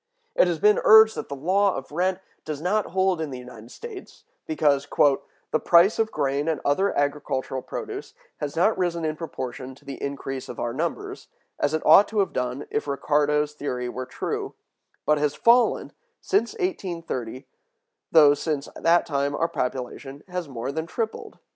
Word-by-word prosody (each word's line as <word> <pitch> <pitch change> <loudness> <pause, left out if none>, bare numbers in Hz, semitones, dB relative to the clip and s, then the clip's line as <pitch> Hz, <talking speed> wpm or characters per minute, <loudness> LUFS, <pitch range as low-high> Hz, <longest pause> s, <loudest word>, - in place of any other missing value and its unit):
It - - +4
has 170 -2 0
been 210 +6 +4
urged 220 0 +8
that - - -6
the 140 - -4
law 190 +7 +2
of 135 +1 -7
rent 185 +4 0 0.2
does 155 -2 -5
not 195 +6 0
hold 190 -2 +1
in 155 - -3
the 130 - -6
United 125 -2 -11
States, 415 - -10 0.2
because 145 - +1 0.6
"the 155 - +2
price 175 +6 +5
of 220 -1 +2
grain 140 0 -1
and 160 -3 0
other 190 +8 +2
agricultural 140 -2 -1
produce - - -7 0.2
has 145 0 -4
not 180 +7 +3
risen 170 -2 0
in 155 0 -1
proportion 130 -5 -6
to 145 - -22
the 140 -1 -8
increase 135 -1 -5
of 120 - -7
our 120 0 -2
numbers, 395 - -4 0.3
as 145 +2 +1
it 155 - -3
ought 205 - +8
to 220 - -6
have 200 -2 +1
done 125 +2 -2
if - - -2
Ricardo's 150 +1 +1
theory 125 -4 -4
were 130 +1 -5
true, - - -4 0.5
but 150 -1 +3
has 150 0 0
fallen, 240 +1 +3 0.3
since 400 +2 0
1830, 170 - -4 0.7
though 150 -3 +7
since 145 -1 -3
that 170 +1 +3
time 140 -1 -1
our 165 - +1
population 135 +1 -4
has 180 -2 -4
been 140 - -12
more 115 +4 -3
than 160 +3 -4
tripled." 225 +4 -4
150 Hz, 175 wpm, -25 LUFS, 140-185 Hz, 0.7 s, urged